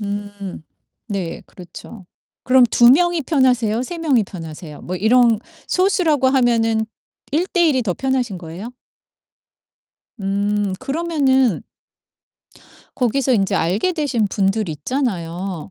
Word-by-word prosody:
음. 205 Hz, -3 st, -6 dB, 0.5 s
네 190 Hz, -5 st, -4 dB
그렇죠. 185 Hz, +2 st, -12 dB, 0.4 s
그럼 255 Hz, 0 st, +5 dB
2 240 Hz, +1 st, +5 dB
명이 345 Hz, +3 st, +3 dB
편하세요, 250 Hz, -6 st, +1 dB
3 340 Hz, +6 st, -6 dB
명이 275 Hz, -9 st, +2 dB
편하세요? 160 Hz, -4 st, -9 dB
뭐 180 Hz, +1 st, -5 dB
이런 230 Hz, +2 st, +4 dB, 0.3 s
소수라고 340 Hz, -8 st, +2 dB
하면은 230 Hz, -4 st, +2 dB, 0.4 s
1:1 335 Hz, -1 st, +2 dB
이 255 Hz, -, +1 dB
더 185 Hz, -6 st, -2 dB
편하신 255 Hz, -7 st, -1 dB
거예요? 175 Hz, +8 st, -8 dB, 1.5 s
음. 200 Hz, +1 st, -1 dB
그러면은 270 Hz, -, +1 dB, 1.3 s
거기서 260 Hz, +1 st, +1 dB
인제 195 Hz, -5 st, +1 dB
알게 195 Hz, -, +1 dB
되신 280 Hz, -10 st, 0 dB
분들 195 Hz, +1 st, 0 dB
있잖아요. 180 Hz, -, -3 dB
225 Hz, 220 characters per minute, -19 LUFS, 195-265 Hz, 1.5 s, 그럼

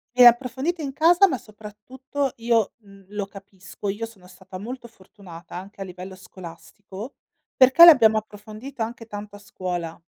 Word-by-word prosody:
E 250 Hz, -, +7 dB
approfondita 265 Hz, +7 st, +2 dB
in 275 Hz, -, -4 dB
casa, 345 Hz, +7 st, +5 dB
ma 265 Hz, -8 st, -2 dB
soprattutto 230 Hz, +7 st, -6 dB
io, 230 Hz, -2 st, +1 dB
mh, 200 Hz, -3 st, -18 dB
lo 205 Hz, -1 st, -4 dB
capisco. 195 Hz, 0 st, -10 dB
Io 210 Hz, +3 st, -3 dB
sono 200 Hz, -5 st, -17 dB
stata 185 Hz, 0 st, -12 dB
molto 235 Hz, +4 st, -8 dB
fortunata 190 Hz, -4 st, -14 dB
anche 195 Hz, +2 st, -10 dB
a -, -, -3 dB
livello 185 Hz, +1 st, -10 dB
scolastico, 190 Hz, +5 st, -11 dB, 0.4 s
perché 265 Hz, +6 st, +8 dB
l'abbiamo 230 Hz, -10 st, +7 dB
approfondita 215 Hz, +4 st, -7 dB
anche 230 Hz, 0 st, -9 dB
tanto 205 Hz, -1 st, -9 dB
a -, -, -13 dB
scuola. 180 Hz, -4 st, -6 dB
210 Hz, 155 wpm, -23 LUFS, 195-250 Hz, 0.4 s, perché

